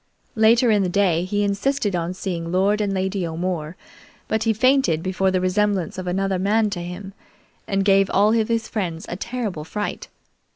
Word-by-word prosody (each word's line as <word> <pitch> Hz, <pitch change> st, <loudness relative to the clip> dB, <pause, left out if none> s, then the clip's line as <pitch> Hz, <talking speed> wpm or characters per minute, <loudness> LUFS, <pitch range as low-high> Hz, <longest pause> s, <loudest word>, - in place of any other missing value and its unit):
Later 230 Hz, +2 st, +4 dB
in 210 Hz, -2 st, +3 dB
the 185 Hz, -, 0 dB
day 180 Hz, -3 st, +2 dB
he 205 Hz, +2 st, 0 dB
insisted 205 Hz, +1 st, 0 dB
on 175 Hz, +1 st, -2 dB
seeing 170 Hz, -3 st, -4 dB
Lord 200 Hz, +4 st, +2 dB
and 205 Hz, -1 st, 0 dB
Lady 190 Hz, 0 st, -1 dB
O'More, 165 Hz, -1 st, -4 dB, 0.5 s
but 220 Hz, +1 st, -1 dB
he 225 Hz, -, +3 dB
fainted 240 Hz, -, +2 dB
before 190 Hz, +1 st, 0 dB
the 185 Hz, 0 st, +1 dB
resemblance 185 Hz, -1 st, 0 dB
of 185 Hz, -, -6 dB
another 190 Hz, +1 st, 0 dB
man 210 Hz, +2 st, +2 dB
to 175 Hz, -3 st, -4 dB
him, 180 Hz, +3 st, -7 dB, 0.5 s
and 195 Hz, -1 st, 0 dB
gave 195 Hz, -1 st, +4 dB
all 210 Hz, +3 st, +3 dB
of 225 Hz, -2 st, +2 dB
his 230 Hz, -1 st, -1 dB
friends 175 Hz, -6 st, -4 dB
a -, -, -3 dB
terrible 210 Hz, -6 st, -4 dB
fright. 205 Hz, +6 st, -4 dB
195 Hz, 180 wpm, -22 LUFS, 180-210 Hz, 0.5 s, Later